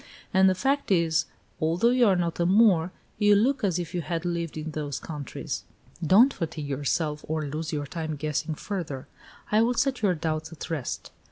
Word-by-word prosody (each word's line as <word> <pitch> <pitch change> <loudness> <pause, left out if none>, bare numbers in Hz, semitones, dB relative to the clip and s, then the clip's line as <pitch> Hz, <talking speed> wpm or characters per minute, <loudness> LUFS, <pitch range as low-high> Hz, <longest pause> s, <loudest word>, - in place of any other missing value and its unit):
And 190 0 +6
the 185 - +1
fact 275 +8 0
is, 165 -4 +3 0.4
although 170 +9 +3
you 250 -2 +4
are 195 - +4
not 170 -1 -1
a 170 - +2
Moor, 185 -4 +4 0.3
you 205 -1 +5
look 255 +6 +2
as 185 -4 +2
if 175 -2 -4
you 175 - -1
had 170 +1 -3
lived 170 -2 -2
in 155 +1 -4
those 145 -2 -3
countries." 150 -4 -5 0.4
"Don't 215 - +6
fatigue 160 -4 -4
yourself, 150 +2 -1
or 155 -1 -1
lose 155 +2 -4
your 145 -2 -2
time 155 +1 -4
guessing 155 +2 -2
further. 160 -9 -5 0.5
I 215 +1 +5
will 240 +2 +2
set 270 0 +1
your 195 -4 +3
doubts 155 0 -3
at 165 0 -8
rest. 145 -7 -4
165 Hz, 190 wpm, -27 LUFS, 155-195 Hz, 0.5 s, And